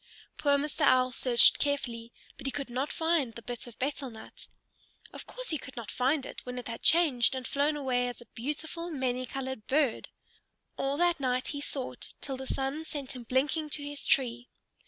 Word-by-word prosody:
Poor 285 -1 +3
Mr. 300 +2 -3
Owl 255 -2 +5
searched 240 -1 +6
carefully, 240 -5 -1 0.2
but - - -6
he - - 0
could 275 -2 -4
not 260 +4 -1
find 320 -8 +1
the 235 - -7
bit 245 +1 -6
of 235 - -12
betel 275 0 -2
nut. 220 -2 -12 0.7
Of - - -7
course - - -3
he 310 - 0
could 260 0 -10
not 220 -3 -5
find 265 +2 +1
it, - - -8
when 250 0 -6
it 250 - -5
had 230 -1 -5
changed 285 -8 +5
and 260 -1 -4
flown 290 +2 +1
away 250 -3 +1
as 245 - -5
a 240 - -12
beautiful, 315 +7 -3
many 255 -4 -1
colored 265 -4 -5
bird! 275 -4 +2 0.7
All 275 +1 -1
that 345 -1 +3
night 255 -2 0
he 285 - -3
sought, 270 -2 -5
till 270 - -4
the 265 0 -7
sun 270 +5 -1
sent 285 -4 -5
him 245 -2 -8
blinking 290 +5 +1
to 290 0 +1
his 290 0 -5
tree. 245 -2 +1
265 Hz, 200 wpm, -30 LUFS, 250-290 Hz, 0.7 s, searched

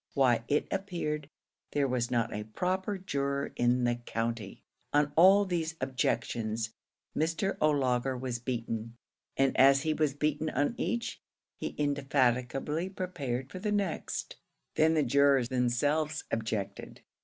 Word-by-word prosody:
Why, 125 -5 +3
it 145 - +1
appeared 170 -7 -3 0.4
there 140 -1 +2
was 125 -2 0
not 115 -2 0
a 105 0 -4
proper 185 - -1
juror 140 -6 -2
in 120 +1 +2
the 120 0 +1
county! 115 -3 -4 0.3
On 145 0 +3
all 195 +4 +7
these 165 -3 -2
objections 115 -3 -1 0.4
Mr. 160 +4 0
O'Laugher 130 -4 +2
was 125 -1 -3
beaten; 115 -2 -4 0.4
and 135 0 +3
as 135 +1 +6
he 155 - +1
was 150 -3 0
beaten 150 +1 0
on 145 - 0
each, 235 -1 -2 0.3
he - - -5
indefatigably 140 +2 0
prepared 140 -10 -4
for 185 - -6
the 210 +2 -1
next. 200 -5 -2 0.4
Then 160 +1 +3
the 155 - +3
jurors 140 -1 +4
themselves 145 +5 +1
objected. 110 -3 -3
140 Hz, 130 wpm, -30 LUFS, 120-155 Hz, 0.4 s, all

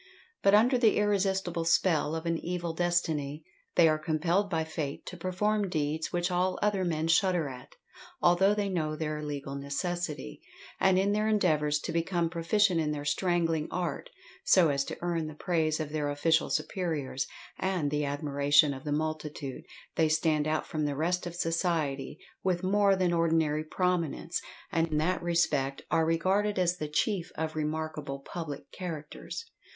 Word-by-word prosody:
But 200 +1 +5
under 245 +4 +4
the 225 -3 +4
irresistable 190 -4 +1
spell 165 -2 +2
of 160 +1 -4
an 165 0 +1
evil 175 -1 -3
destiny, 160 -4 -1 0.3
they 170 -2 +7
are 155 -1 +2
compelled 165 +6 +1
by 165 -3 0
fate 155 -3 -5
to 180 - -7
perform 195 +3 0
deeds 155 -1 -1
which 175 +1 0
all 180 +1 +1
other 205 -2 +1
men 160 -2 0
shudder 175 -1 +3
at, 130 -2 -10 0.4
although 190 +4 +4
they 205 -1 0
know 160 -5 -1
their 155 -1 -3
legal 140 -2 -5
necessity; 140 - -4 0.4
and 190 -1 +4
in 195 +2 +2
their 210 +1 +1
endeavours 155 -8 +2
to - - -4
become 170 0 0
proficient 175 +2 +2
in 155 - -1
their 145 -1 -3
strangling 165 0 +1
art, 175 -5 -3 0.3
so 175 -4 +5
as 140 -1 +1
to - - -6
earn 170 -2 -1
the 155 - -8
praise 160 -2 0
of 155 -2 -3
their 150 -2 -1
official 160 +3 +2
superiors, 155 -8 -2 0.3
and 180 -7 0
the 150 0 0
admiration 145 0 +3
of 135 - -9
the 150 - -3
multitude, 150 -2 -3 0.4
they 160 -1 +4
stand 155 -1 +2
out 155 0 0
from 155 -2 -2
the 145 -1 -1
rest 175 +4 0
of 175 - -7
society 165 -5 -1 0.3
with 185 -1 0
more 200 +1 +4
than 185 -2 +1
ordinary 160 -2 +2
prominence, 170 0 -1 0.3
and 165 -3 +2
in 155 -2 -1
that 175 +4 +1
respect 150 -6 0
are 160 0 +3
regarded 190 +5 +1
as 180 -1 +2
the 155 - -3
chief 180 +3 0
of 160 0 -2
remarkable 155 -2 -3
public 145 +1 -7
characters. 165 - -6
165 Hz, 165 wpm, -29 LUFS, 150-180 Hz, 0.4 s, they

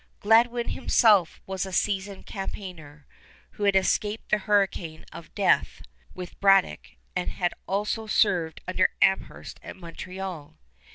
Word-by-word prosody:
Gladwin 235 +3 +3
himself 205 -7 +3
was 190 -1 -3
a 190 - -6
seasoned 195 +1 -2
campaigner, 175 -7 -8 0.5
who 205 - -4
had 200 -1 +3
escaped 205 +3 0
the 215 - +3
hurricane 190 -6 0
of - - -12
death - - +1 0.3
with 180 -1 -9
Braddock 195 -1 +3 0.2
and 180 -1 -1
had 175 -2 -2
also 210 +3 -2
served 180 -7 +1
under 185 0 +2
Amherst 190 0 0
at - - -9
Montreal. 180 - -8
190 Hz, 125 wpm, -26 LUFS, 180-205 Hz, 0.5 s, Gladwin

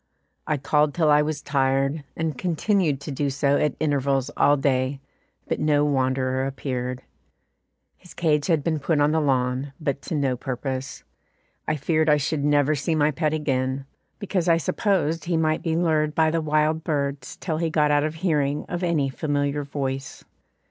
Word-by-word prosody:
I 155 - +1
called 150 +2 +1
till 160 -3 +3
I 150 0 +6
was 150 -1 -3
tired, 135 +1 0
and 160 -3 -1
continued 175 -2 0
to 145 - -6
do 140 +1 -1
so 140 +1 +1
at 150 - 0
intervals 140 -2 0
all 145 - +4
day, 135 0 0 0.5
but - - -1
no 150 -1 +2
wanderer 130 -1 0
appeared. 130 -2 -4 0.9
His 180 - -16
cage 150 -3 +1
had 160 -5 +2
been 160 -1 0
put 145 +2 0
on 145 +1 +3
the 160 0 +2
lawn, 130 0 0
but 140 -3 -2
to 160 - -4
no 135 -3 +1
purpose. 130 +1 -5 0.6
I - - +1
feared 155 +2 +1
I 150 - +5
should 145 +1 -1
never 145 0 +3
see 155 +3 -1
my 150 0 +3
pet 155 +1 0
again, 135 -3 -1 0.3
because 190 -4 -2
I 165 - +5
supposed 165 -1 0
he 170 -1 0
might 155 -1 +1
be 165 -2 -1
lured 155 -3 +1
by 160 -1 +3
the 165 0 0
wild 155 +1 +1
birds 140 -4 -2
till 160 -4 -3
he 165 0 0
got 150 -2 +2
out 145 0 +3
of 155 +1 -2
hearing 150 -4 0
of 175 0 -4
any 165 -6 +1
familiar 145 +1 -1
voice. 135 -1 -4
145 Hz, 175 wpm, -24 LUFS, 135-155 Hz, 0.9 s, I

